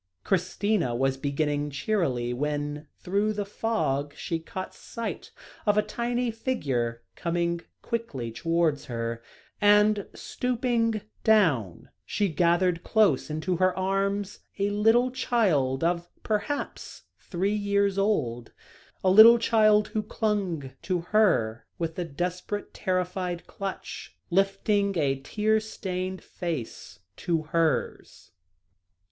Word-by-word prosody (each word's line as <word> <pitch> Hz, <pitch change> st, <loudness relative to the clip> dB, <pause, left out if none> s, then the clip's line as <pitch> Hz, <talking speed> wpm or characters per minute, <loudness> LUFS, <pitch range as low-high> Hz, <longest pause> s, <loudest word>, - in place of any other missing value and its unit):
Christina 185 Hz, -, 0 dB
was 135 Hz, +2 st, +1 dB
beginning 145 Hz, +1 st, -1 dB
cheerily, 140 Hz, -, -1 dB
when, 145 Hz, +2 st, -3 dB
through 205 Hz, +4 st, 0 dB
the 205 Hz, -1 st, -3 dB
fog, 145 Hz, -10 st, -1 dB
she 165 Hz, -, -3 dB
caught 185 Hz, +3 st, -7 dB
sight 230 Hz, -1 st, -6 dB, 0.4 s
of 205 Hz, 0 st, +4 dB
a 210 Hz, -, +4 dB
tiny 240 Hz, +1 st, -1 dB
figure 130 Hz, -, -2 dB
coming 170 Hz, 0 st, -1 dB, 0.2 s
quickly 145 Hz, -, -3 dB
towards 165 Hz, +3 st, 0 dB
her, 115 Hz, -1 st, -4 dB, 0.4 s
and, 210 Hz, 0 st, +4 dB
stooping 235 Hz, -3 st, -1 dB, 0.2 s
down, 155 Hz, -, +2 dB
she 200 Hz, -, 0 dB
gathered 170 Hz, +2 st, +2 dB
close 210 Hz, -, +3 dB
into 155 Hz, +4 st, -1 dB
her 185 Hz, +1 st, +2 dB
arms 195 Hz, +1 st, -1 dB, 0.2 s
a 200 Hz, 0 st, 0 dB
little 225 Hz, +5 st, +3 dB
child, 170 Hz, -, +1 dB
of 175 Hz, 0 st, 0 dB
perhaps 215 Hz, +7 st, -3 dB, 0.2 s
three 195 Hz, +3 st, -1 dB
years 200 Hz, -1 st, +1 dB
old, 125 Hz, -, 0 dB, 0.5 s
a 185 Hz, -, +4 dB
little 220 Hz, +4 st, +10 dB
child 215 Hz, -2 st, +4 dB
who 215 Hz, -, -1 dB
clung 200 Hz, -, -2 dB
to 180 Hz, -3 st, -1 dB
her 170 Hz, -, +2 dB
with 165 Hz, 0 st, -3 dB
a 175 Hz, -, -1 dB
desperate, 180 Hz, +6 st, -4 dB
terrified 180 Hz, -1 st, -2 dB
clutch, 195 Hz, -3 st, -7 dB
lifting 195 Hz, +1 st, +1 dB
a 135 Hz, -3 st, +1 dB
tear 215 Hz, +9 st, +1 dB
stained 185 Hz, -3 st, -4 dB
face 145 Hz, -, -5 dB, 0.2 s
to 165 Hz, -2 st, -1 dB
hers. 160 Hz, 0 st, -1 dB
185 Hz, 115 wpm, -27 LUFS, 150-210 Hz, 0.5 s, little